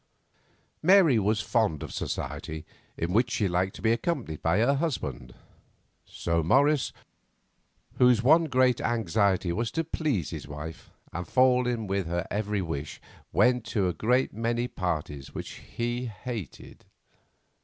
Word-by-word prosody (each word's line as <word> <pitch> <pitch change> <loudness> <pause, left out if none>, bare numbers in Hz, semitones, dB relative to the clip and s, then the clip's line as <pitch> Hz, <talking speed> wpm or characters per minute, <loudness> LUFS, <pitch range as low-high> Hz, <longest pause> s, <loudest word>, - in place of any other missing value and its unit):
Mary 170 - +6
was 105 +1 +1
fond 105 - 0
of - - -7
society, 80 0 -4 0.3
in 85 +2 -2
which 115 +4 +3
she 105 - 0
liked 95 +1 0
to - - -11
be 110 - +4
accompanied 115 - -2
by 80 +1 +2
her 120 +6 +3
husband, 75 - -3 0.7
so 85 -1 -1
Morris, 140 - +3 1.1
whose 125 -2 +5
one 160 +6 +6
great 130 -4 +2
anxiety 100 -5 +1
was 115 +5 -1
to 165 - -1
please 150 - -1
his - - -6
wife 75 +2 -8 0.2
and 85 +1 -4
fall 125 -1 +4
in 120 -3 -1
with 95 -2 -1
her 85 0 -2
every 105 -1 -1
wish, 75 -3 -5 0.3
went 125 -1 +3
to 105 -4 0
a 90 - -1
great 125 +10 +1
many 115 +2 -1
parties 75 - -4
which - - -5 0.3
he 120 +1 -1
hated. 110 - -7
110 Hz, 145 wpm, -27 LUFS, 85-125 Hz, 1.1 s, Mary